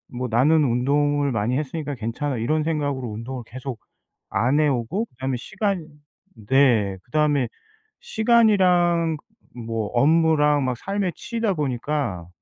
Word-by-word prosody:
'뭐 125 +1 -2
나는 150 +7 +4
운동을 145 +3 +1
많이 115 +3 0
했으니까 145 0 -4
괜찮아.' 120 +4 -3
이런 155 +7 0
생각으로 145 -5 -2
운동을 120 +4 -6
계속 130 -1 -7 0.5
안 130 +7 +1
해 150 - +4
오고 140 - -1
그다음에 130 - -4
시간 195 - -3 0.6
네. 120 -8 +3
그다음에 145 -1 +1 0.5
시간이랑 185 - +3 0.4
뭐 115 -3 -3
업무랑 150 0 +3
막 125 - -1
삶에 195 - -2
치이다 230 -4 -2
보니까 135 - -2
145 Hz, 280 characters per minute, -23 LUFS, 125-160 Hz, 0.6 s, 나는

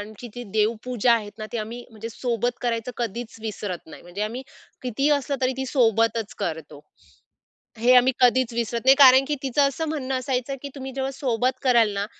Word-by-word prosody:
आमची 215 +3 -9
ती 245 - -6
देवपूजा 230 +2 +1
आहेत 210 -3 -1
ना, 215 - -5
ते 235 - -2
आम्ही 230 +3 -6
म्हणजे 225 +1 -8
सोबत 240 0 -2
करायचं 235 0 -2
कधीच 235 0 -4
विसरत 205 -6 -5
नाही. - - -12
म्हणजे 175 +4 -6
आम्ही 235 +5 -3 0.4
कितीही 265 +4 0
असलं 280 +1 -3
तरी 255 0 +1
ती 265 - -3
सोबतच 230 -4 +1
करतो. 155 -3 -5 1.0
हे 245 +3 +5
आम्ही 250 +1 +5
कधीच 250 -1 +3
विसरत 235 +1 -2
नाही, 270 +1 +8
कारण 265 -1 +7
की 295 - 0
तिचं 270 +1 +1
असं 320 +4 -3
म्हणणं 270 -4 -2
असायचं 255 +1 -2
की 280 - -6
तुम्ही 265 -1 -6
जेव्हा 270 0 -1
सोबत 255 -1 -1
कराल 235 -4 +4
ना, 200 0 -2
240 Hz, 185 wpm, -24 LUFS, 220-260 Hz, 1.0 s, नाही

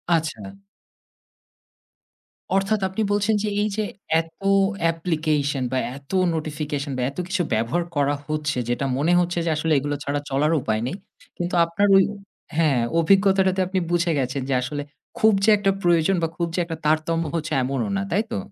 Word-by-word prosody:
আচ্ছা। 110 -12 -3 2.0
অর্থাৎ 195 +2 +1
আপনি 190 +4 -3
বলছেন 205 +1 +2
যে - - -1
এই 210 - +1
যে 215 - +1 0.4
এতো 165 +4 -5 0.4
application 155 -4 -1
বা 130 - 0 0.2
এতো 140 +7 -6 0.2
নোটিফিকেশন 150 -2 -3
বা - - -1
এত 140 - -14
কিছু 195 -1 0
ব্যবহার 115 +11 0
করা 145 0 +2
হচ্ছে 150 -2 -2
যেটা 120 +3 0
মনে 165 +5 +2
হচ্ছে 175 0 0
যে - - +1
আসলে 160 0 +1
এগুলো 145 +1 -2
ছাড়া 145 +1 -1
চলার 150 +4 +1
উপায় 110 -1 -1
নেই, 175 - -3 0.4
কিন্তু 175 0 -2
আপনার 195 +5 +1
ঐ - - +9 0.6
হ্যাঁ 150 -7 +3 0.2
অভিজ্ঞতাটাতে 190 +1 +3
আপনি 190 0 0
বুঝে 170 0 +2
গেছেন 130 +1 -2
যে - - +1
আসলে 145 +3 -3 0.4
খুব 220 -1 +5
যে 220 - +5
একটা 195 -1 +2
প্রয়োজন 175 +2 +3
বা - - +3
খুব 170 -1 0
যে - - 0
একটা 165 -2 -5
তারতম্য 160 +2 +1
হচ্ছে 155 -1 -3
এমনও 135 +4 -1
না, - - -1
তাই 205 +5 +2
তো? - - -1
160 Hz, 170 wpm, -23 LUFS, 145-185 Hz, 2.0 s, ঐ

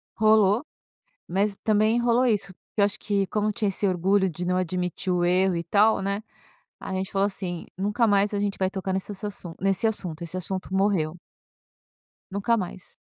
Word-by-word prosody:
Rolou, 215 +1 +4 0.6
mas 195 +3 0
também 215 +2 +3
rolou 240 +1 +3
isso, 205 -5 0
porque 210 - -7
eu - - +6
acho 200 - 0
que, 200 -2 0
como 210 +2 0
tinha 210 -1 -1
esse 195 +1 +1
orgulho 190 +2 +2
de 175 +2 -5
não 180 +1 +1
admitir 180 +1 -1
o 175 -1 +1
erro 180 0 +3
e 170 - -3
tal, 210 +6 +4
né, 200 +2 -2 0.6
a 190 - -6
gente 190 +1 -3
falou 195 0 +2
assim: 185 -4 -4
"Nunca 205 +5 +1
mais 205 -1 +3
a - - 0
gente 200 -1 -1
vai 190 -1 +2
tocar 190 0 -3
nesse 190 +2 -3
assassun 195 -4 -6
nesse 195 +4 +1
assunto, 180 -7 -3
esse 170 +2 -5
assunto 185 +1 -4
morreu. 190 -5 +1 1.1
Nunca 205 +4 +1
mais. 185 -2 -6
195 Hz, 185 wpm, -25 LUFS, 185-210 Hz, 1.1 s, eu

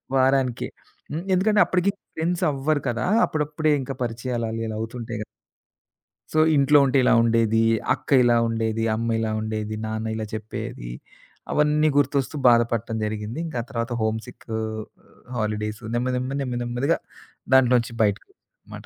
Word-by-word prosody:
వారానికే. 130 -2 +2 0.4
హ్మ్. 160 +4 -3
ఎందుకంటే, 205 +3 +3
అప్పటికి 185 +2 +1 0.2
ఫ్రెండ్స్ 170 +2 -1
అవ్వరు 145 +1 0
కదా! 115 -1 -1 0.2
అప్పుడప్పుడే 150 0 0
ఇంకా 135 +1 -4
పరిచయాలు 120 0 -3
అలా 115 0 -3
ఇలా 110 - -4
అవుతుంటాయి 115 0 -5
గ - - -2 1.1
సో 155 - +3 0.2
ఇంట్లో 145 +1 +5
ఉంటే 135 +1 +2
ఇలా - - +4
ఉండేది, 115 -1 +3 0.3
అక్క - - -9
ఇలా 120 -1 +4
ఉండేది, 115 0 -1
అమ్మ 115 +1 -2
ఇలా 110 -1 -1
ఉండేది, 110 0 -3
నాన్న 110 0 -3
ఇలా 110 0 -3
చెప్పేది, 105 - -6 0.6
అవన్నీ 150 +1 +3
గుర్తొస్తూ 140 0 +1
బాధపట్టం 115 -1 +2
జరిగింది. 105 +4 -4
ఇంకా 150 - -5
ఆ - - -16
తర్వాత 115 -2 -3
హోమ్ 110 0 0
సిక్ 125 -1 -14
ఆహ్, 110 0 -3 0.5
హాలిడేసు 105 0 -2
నెమ్మ 125 +2 0
నెమ్మ, 130 +1 -3
నెమ్మ 125 -2 -2
నెమ్మదిగా 120 +7 0 0.6
దాంట్లో 125 -1 +5
నుంచి 115 0 -6
బయటకొచ్చానుమాట. 100 -1 -5
120 Hz, 145 wpm, -24 LUFS, 110-140 Hz, 1.1 s, ఇంట్లో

